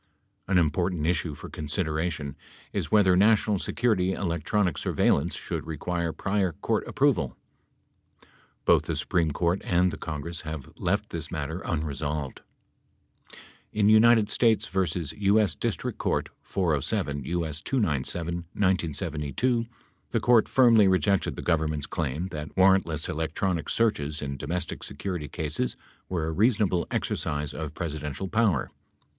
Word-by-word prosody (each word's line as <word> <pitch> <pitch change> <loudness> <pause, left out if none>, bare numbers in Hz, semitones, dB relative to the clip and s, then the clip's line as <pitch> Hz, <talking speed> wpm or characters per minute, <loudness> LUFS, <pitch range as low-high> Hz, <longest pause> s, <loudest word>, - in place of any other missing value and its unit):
An 95 - +3
important 85 0 +1
issue 80 -2 0
for - - -9
consideration 75 -2 -2 0.4
is - - -2
whether 100 -4 +5
national 105 0 +4
security 100 -6 +1
electronic 90 0 0
surveillance 80 +5 +1
should - - -5
require 85 +2 -2
prior 95 0 0
court - - -1
approval. - - +1 1.3
Both - - +4
the - - -2
Supreme 85 -3 +1
Court 85 +5 0
and 90 0 +2
the - - -7
Congress 80 +1 -5
have 75 -3 -7
left - - -1
this 80 -3 -3
matter 80 +1 -4
unresolved. 75 -4 -3 1.3
In 105 -1 +3
United 110 -1 +6
States 110 -3 +3
v. 95 - -2 0.5
U.S. 105 +1 +4
Distinct - - -3
Court, - - 0
407 75 -5 -1
U.S. 80 -2 -2
297 85 - -1 0.2
(1972), 90 - 0 0.4
the 115 - 0
Court 120 0 +4
firmly 115 -6 +6
rejected 95 +1 +2
the - - -6
Government's 75 -3 0
claim 80 +4 -3
that 75 -2 -7
warrantless 95 -4 +3
electronic 80 +1 -2
searches 75 -10 0
in 70 -1 -4
domestic 85 +5 -3
security 90 -6 -4
cases 75 -7 -2 0.3
were 85 -4 -1
a 80 - -2
reasonable 100 -1 +2
exercise 75 0 -2
of 75 -1 -5
Pres 85 -4 -3
idential 75 +5 -5
power. 110 - +2
85 Hz, 125 wpm, -27 LUFS, 75-100 Hz, 1.3 s, United